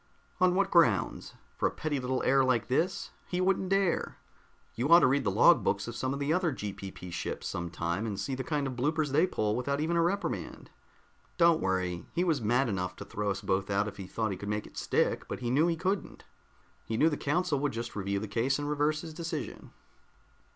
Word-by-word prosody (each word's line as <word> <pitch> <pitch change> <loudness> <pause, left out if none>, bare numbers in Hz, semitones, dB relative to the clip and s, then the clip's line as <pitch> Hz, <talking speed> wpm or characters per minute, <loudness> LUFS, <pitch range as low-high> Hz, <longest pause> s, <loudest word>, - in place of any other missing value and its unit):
"On 180 -1 +4
what 195 0 +1
grounds? 155 - +2 0.2
For - - +3
a - - 0
petty 150 -2 -2
little 130 0 -1
error 135 +1 +4
like 125 -3 +1
this? 170 +9 0 0.2
He 180 - -2
wouldn't 185 0 +1
dare! 195 -2 +1 0.6
You 125 +5 -2
ought 170 +1 +9
to - - +5
read 135 +2 +2
the 100 - +1
log 95 - +5
books - - 0
of - - -6
some 130 - -2
of 140 - -3
the 145 +2 +1
other 180 -1 +1
GPP 95 -6 -7
ships - - -4
some 85 0 -4
time 85 +6 -2
and 100 -3 -4
see 100 +7 -3
the 130 0 -3
kind 150 -2 -1
of 130 -2 -3
bloopers 150 +3 0
they 155 +6 +4
pull 105 - -1
without 140 +3 -1
even 160 +3 0
a 170 - +3
reprimand. 195 +4 -2 0.7
Don't 170 -2 +5
worry, 90 -2 -1
he 175 - +2
was 160 -7 +1
mad 120 +5 +2
enough 90 -3 -2
to - - -9
throw 105 0 -3
us 100 0 -2
both 95 0 -1
out 100 +1 +1
if 105 - -7
he 95 -2 -7
thought 110 0 -2
he 95 - -4
could 100 +2 -6
make 105 0 -2
it - - -15
stick, - - 0
but - - -5
he 120 -1 -2
knew 150 +6 +4
he 170 -1 0
couldn't. 190 +3 -2 0.6
He 110 - -3
knew 155 - +5
the 150 - -1
council 150 +1 0
would 145 0 0
just 115 +1 -5
review 100 -1 -1
the 110 +2 -3
case 115 +6 0
and 145 0 -3
reverse 150 +1 +1
his 160 -2 -8
decision." 165 -2 -5
135 Hz, 230 wpm, -30 LUFS, 105-165 Hz, 0.7 s, ought